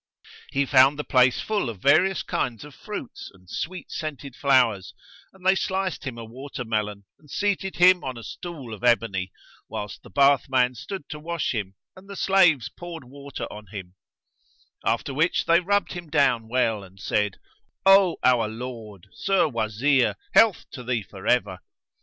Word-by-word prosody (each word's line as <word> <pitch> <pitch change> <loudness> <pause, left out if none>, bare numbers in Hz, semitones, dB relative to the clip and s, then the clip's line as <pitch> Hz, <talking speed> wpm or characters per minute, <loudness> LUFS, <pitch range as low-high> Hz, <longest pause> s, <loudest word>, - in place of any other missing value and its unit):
He 140 +1 +1
found 135 +1 +5
the 150 - -3
place 130 -2 +3
full 210 - -1
of 110 - -6
various 160 - +3
kinds 120 +3 -3
of 150 - -12
fruits 205 - -8
and 90 -1 -22
sweet 180 - -5
scented 145 -4 -6
flowers, 125 -9 +2 0.4
and 190 -1 -19
they 190 - +6
sliced 190 -2 -2
him 125 -3 -5
a 115 - -7
watermelon 110 -5 -4 0.2
and 150 - -22
seated 200 0 -1
him 180 0 +5
on 130 -2 -5
a 115 - -9
stool 150 -9 -8
of 110 - -10
ebony, 115 -6 +1 0.4
whilst 105 -2 -6
the - - -15
bathman 135 -3 +3
stood 150 - -7
to 150 - -6
wash 170 -1 -2
him 100 -4 -4 0.2
and 190 +1 -16
the 200 - -7
slaves 180 - +4
poured 170 -3 -9
water 140 +2 -8
on 105 0 -11
him; 95 -2 -9 0.9
after 120 +4 -1
which 155 +6 +1
they 170 +1 +5
rubbed 200 +3 0
him 175 -3 -8
down 135 -7 +2
well 115 -4 0
and 95 0 -16
said, 105 0 -1 0.5
"O 195 -2 +6
our 125 -3 +4
lord, 110 -4 -8
Sir 195 -4 +2
Wazir, 120 +2 +1 0.2
health 220 -5 +5
to 125 - -8
thee 120 -3 -1
forever!" 95 0 -1
130 Hz, 165 wpm, -25 LUFS, 110-170 Hz, 0.9 s, they